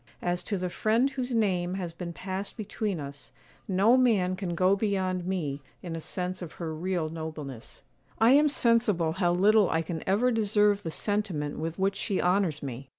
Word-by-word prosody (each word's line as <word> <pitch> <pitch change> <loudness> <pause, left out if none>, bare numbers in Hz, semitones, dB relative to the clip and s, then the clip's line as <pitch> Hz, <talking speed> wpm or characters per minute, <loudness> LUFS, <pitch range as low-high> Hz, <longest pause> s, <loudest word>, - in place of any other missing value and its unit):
As 175 0 0
to 205 - -1
the 180 -1 -3
friend 230 +8 +2
whose 260 -2 -3
name 185 -6 +1
has 175 -3 -4
been 170 0 -6
passed 190 - -5
between 210 -3 -3
us, 140 0 -8 0.4
no 200 +5 +4
man 210 -8 +3
can 185 -3 -4
go 185 +3 +4
beyond 190 -3 -1
me 150 -7 -2 0.2
in 170 -2 -5
a 165 - -5
sense 180 +2 -4
of 175 - -7
her 165 -2 -5
real 175 0 -2
nobleness; 155 -6 -7 0.3
I 225 +2 +5
am 295 +2 +6
sensible 230 - +2
how 175 +1 +1
little 205 +3 +4
I 160 0 +1
can 160 -1 -5
ever 230 +6 +3
deserve 210 -2 +2
the 165 - -4
sentiment 180 -7 -2
with 165 +1 -4
which 195 +1 0
she 195 - -1
honours 180 -5 +1
me. 135 0 -6
185 Hz, 185 wpm, -28 LUFS, 165-210 Hz, 0.4 s, am